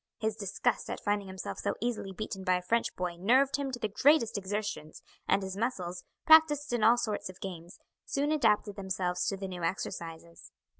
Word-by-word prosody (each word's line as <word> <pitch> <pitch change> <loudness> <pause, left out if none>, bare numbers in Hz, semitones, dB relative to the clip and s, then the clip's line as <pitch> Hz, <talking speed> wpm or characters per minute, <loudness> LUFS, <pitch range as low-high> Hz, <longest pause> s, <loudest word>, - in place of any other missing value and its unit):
His 220 -1 -1
disgust 200 -3 -1
at - - -4
finding 205 -1 -1
himself 190 0 -6
so - - -1
easily 230 -4 -2
beaten 195 -1 -5
by 185 -1 +3
a 180 - -1
French 230 +6 0
boy 180 -1 -3
nerved 265 +8 +3
him 280 -1 -2
to 255 - -4
the 220 - -1
greatest 245 +3 +3
exertions, 200 -5 -4 0.2
and 195 - +2
his 190 0 -5
muscles, 185 -6 -3 0.2
practised 300 -4 +6
in 235 -3 +1
all 230 +3 +6
sorts 215 -5 -2
of 185 - -11
games, 175 -2 -8 0.3
soon 285 +2 -1
adapted 215 -8 +2
themselves 185 -2 -1
to 195 - -1
the 195 0 -5
new 180 -2 -6
exercises. 170 -1 -5
205 Hz, 190 wpm, -30 LUFS, 185-240 Hz, 0.3 s, practised